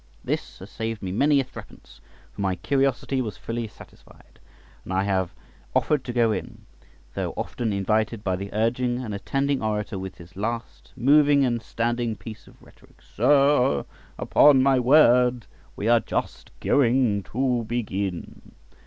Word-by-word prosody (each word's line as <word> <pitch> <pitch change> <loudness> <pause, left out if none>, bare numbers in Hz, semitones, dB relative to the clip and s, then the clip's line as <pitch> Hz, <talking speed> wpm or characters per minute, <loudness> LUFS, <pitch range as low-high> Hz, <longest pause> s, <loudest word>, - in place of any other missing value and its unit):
This - - -4
has - - -12
saved 110 -1 -4
me 95 - -3
many 140 +8 +3
a - - +1
threepence, 130 - -14 0.3
for - - -8
my 95 -2 0
curiosity 135 - 0
was 110 -5 -5
fully 115 0 -4
satisfied, - - -18 0.4
and - - -9
I 95 +1 +1
never 95 -3 0 0.5
offered 150 -4 +2
to 125 - -4
go 120 -2 +2
in, - - -6 0.5
though - - -3
often 115 -3 -3
invited 110 +2 0
by 95 -3 0
the 100 +2 -6
urging 120 +3 0
and 120 -5 -5
attending 135 +7 -1
orator 105 -2 -2
with 95 -1 -7
his 85 +2 -14
last 115 +4 -5
moving 145 +2 +4
and 120 -2 -1
standing 120 0 -2
piece 110 +2 -11
of - - -19
rhetoric, - - -21
"Sir, 140 -2 +3 0.3
upon 140 -3 +5
my 135 -1 +4
word, 125 -3 +4 0.3
we 105 - -3
are 120 0 +5
just - - -4
going 125 -6 +2
to 125 -1 0
begin." 100 -6 -4
115 Hz, 155 wpm, -24 LUFS, 105-130 Hz, 0.5 s, upon